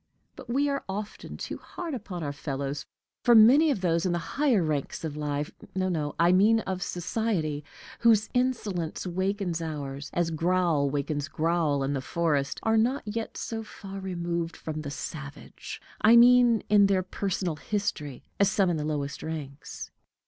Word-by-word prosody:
But - - -12
we 275 +4 +2
are 280 -1 -1
often 205 +2 -6
too - - -5
hard 340 -3 -6
upon 195 -8 -5
our 145 -1 -3
fellows; 140 0 -4 0.4
for 240 - +6
many 260 +9 +7
of 260 -10 0
those 170 -2 +1
in 180 - +1
the - - +1 0.2
higher 270 - +3
ranks 150 -1 -2
of 155 -2 -4
life 150 0 -2 0.2
no, 185 0 +1
no, 150 -4 -2
I 170 +1 +5
mean 210 +5 +5
of 190 -2 -4
society 175 -5 -1 0.4
whose 220 -3 +4
insolence 220 -12 -1
wakens 185 -1 -1
ours, 145 -3 -5
as 175 -1 0
growl 165 -3 +2
wakes 145 +1 -2
growl 155 -3 +1
in 135 +1 -1
the 135 - -2
forest, 145 -1 0
are 225 0 +3
not 250 +5 +2
yet 220 +2 -4
so 225 -1 -4
far 195 -2 -9
removed 170 -3 -3
from 155 -1 -5
the 145 - -5
savage 145 0 -7 0.2
I 225 +2 +7
mean 240 -1 +6
in 205 -1 +6
their 190 -2 +2
personal 185 -3 -2
history 155 -8 -3 0.2
as 200 -1 +5
some 195 -2 +2
in 165 - 0
the 150 - -2
lowest 145 -2 -3
ranks. 150 -3 -6
175 Hz, 170 wpm, -28 LUFS, 150-210 Hz, 0.4 s, many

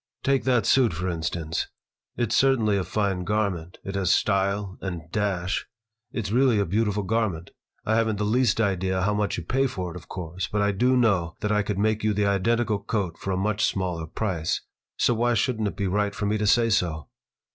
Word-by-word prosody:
"Take 135 -3 +1
that 125 -3 +3
suit, 125 -8 +4
for 90 +3 -3
instance. 80 -1 -2 0.5
It's 120 -2 0
certainly 120 -6 +3
a 95 - 0
fine 95 0 -1
garment. 95 -4 -1
It 100 - -5
has 95 -3 0
style 100 -1 +1
and 90 -4 -4
dash. 95 -3 -1 0.4
It's 110 -5 -3
really 125 -1 +4
a 100 - +2
beautiful 105 +2 0
garment. 100 -6 -1 0.3
I 110 - +1
haven't 110 -2 +1
the 105 - -2
least 115 0 +2
idea 95 -3 +1
how 105 +2 +2
much 105 0 -1
you 85 - -4
pay 135 +9 +1
for 90 -7 -4
it, - - -13
of 90 - -10
course, 90 0 -5
but 105 -1 0
I 100 - +2
do 125 +6 +2
know 95 -9 +2
that 105 - 0
I 105 0 +3
could 105 -1 -3
make 110 +1 +1
you 110 -1 +2
the 105 0 +1
identical 105 +2 +1
coat 100 -4 -3
for - - -5
a 95 - 0
much 105 +2 0
smaller 90 -4 -1
price. 85 -3 -2 0.4
So 120 - +3
why 120 +1 +1
shouldn't 110 -1 0
it - - -5
be 100 - -1
right 100 +2 0
for 105 - -2
me 105 +1 0
to 105 - 0
say 115 +2 +4
so?" 85 -7 0
100 Hz, 210 wpm, -25 LUFS, 95-110 Hz, 0.5 s, suit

